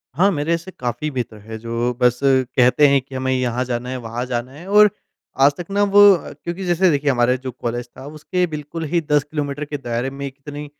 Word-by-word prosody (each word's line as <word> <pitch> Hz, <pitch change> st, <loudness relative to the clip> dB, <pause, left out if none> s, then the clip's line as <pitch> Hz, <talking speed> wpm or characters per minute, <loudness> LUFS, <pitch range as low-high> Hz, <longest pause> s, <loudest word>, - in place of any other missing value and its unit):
हाँ, 185 Hz, +6 st, +4 dB
मेरे 165 Hz, 0 st, 0 dB
से 180 Hz, +3 st, -11 dB
काफ़ी 125 Hz, +4 st, -2 dB
बेहतर 120 Hz, -4 st, -4 dB
है 110 Hz, +2 st, -8 dB
जो 115 Hz, +2 st, -2 dB
बस 125 Hz, 0 st, +3 dB
कहते 130 Hz, +1 st, +4 dB
हैं 140 Hz, -1 st, +3 dB
कि 135 Hz, +1 st, -12 dB
हमें 130 Hz, 0 st, -1 dB
यहाँ 125 Hz, -1 st, 0 dB
जाना 125 Hz, 0 st, -3 dB
है 130 Hz, -, -3 dB
वहाँ 120 Hz, 0 st, -5 dB
जाना 125 Hz, 0 st, -3 dB
है। 155 Hz, +7 st, -12 dB
और 210 Hz, +1 st, +6 dB, 0.6 s
आज 145 Hz, -, +6 dB
तक 175 Hz, -, -6 dB
ना 200 Hz, +1 st, +2 dB
वो 205 Hz, 0 st, +4 dB, 0.4 s
क्योंकि 175 Hz, +3 st, -4 dB
जैसे 180 Hz, +1 st, +3 dB
देखिए 145 Hz, 0 st, +1 dB
हमारे 125 Hz, +1 st, +2 dB
जो 130 Hz, 0 st, -6 dB
कॉलेज 120 Hz, 0 st, -4 dB
था 130 Hz, -, -9 dB
उसके 155 Hz, +5 st, -2 dB
बिल्कुल 155 Hz, +1 st, -6 dB
ही 170 Hz, -, +3 dB
10 145 Hz, -2 st, +4 dB
किलोमीटर 145 Hz, -1 st, -4 dB
के 145 Hz, 0 st, -5 dB
दायरे 120 Hz, -1 st, -3 dB
में 140 Hz, +1 st, -6 dB
कितनी 145 Hz, +2 st, -9 dB
135 Hz, 215 wpm, -20 LUFS, 125-155 Hz, 0.6 s, और